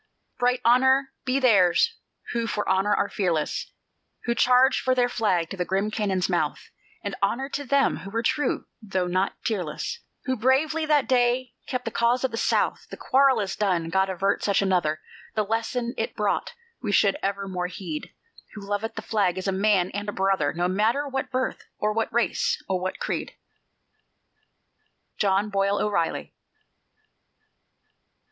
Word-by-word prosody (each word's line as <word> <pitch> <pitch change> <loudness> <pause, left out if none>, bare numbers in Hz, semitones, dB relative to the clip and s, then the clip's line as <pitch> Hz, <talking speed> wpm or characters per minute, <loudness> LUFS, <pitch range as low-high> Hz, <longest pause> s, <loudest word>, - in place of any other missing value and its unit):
Bright 250 0 +2
honor 265 +3 +4
be 260 +1 +1
theirs 230 - +4 0.4
who 235 -1 -1
for 210 - -2
honor 190 +2 +2
were - - +1
fearless, 170 -6 -1 0.5
Who 235 - 0
charged 250 +2 +4
for 255 0 +2
their 245 -1 +3
flag 185 -9 0
to 195 - -5
the 180 - 0
grim 195 +4 -1
cannon's 195 -4 0
mouth; - - -2 0.3
And - - -3
honor 265 +3 0
to 285 - -3
them 280 +1 +2
who 195 - -8
were 230 +3 -2
true, 295 +4 0 0.2
though 190 -4 -1
not 185 +2 0
tearless, 205 - -3 0.3
Who 260 - 0
bravely 290 +7 +1
that 295 -2 +3
day 245 0 +2
kept 255 -2 -3
the 230 - -2
cause 235 +3 +1
of 260 - 0
the 225 - -4
South. - - 0
The - - -8
quarrel 270 -1 +3
is 195 -2 -2
done 175 -5 0
God 190 +1 +2
avert 195 +2 0
such 200 -2 +2
another; 175 -6 +1 0.3
The 215 - +2
lesson 235 +2 -2
it - - -2
brought - - -1 0.3
we 215 - -2
should 200 -1 +3
evermore 195 -2 -2
heed: 175 -4 -6 0.4
Who 210 - -7
loveth 205 +2 -2
the - - -5
Flag 195 -5 +1
is 185 - -3
a - - +2
man 190 -2 +2
and 205 +1 -4
a - - -1
brother, 190 -7 +1
No 175 +1 0
matter 220 +10 +1
what 265 -1 -3
birth 260 0 -2
or 210 0 0
what 225 +1 -1
race 235 0 +1
or 185 -1 0
what 185 0 -3
creed. - - -3 1.8
JOHN 200 +1 +2
BOYLE 200 +1 +1
O'REILLY. 200 -6 -1
210 Hz, 165 wpm, -25 LUFS, 190-250 Hz, 1.8 s, honor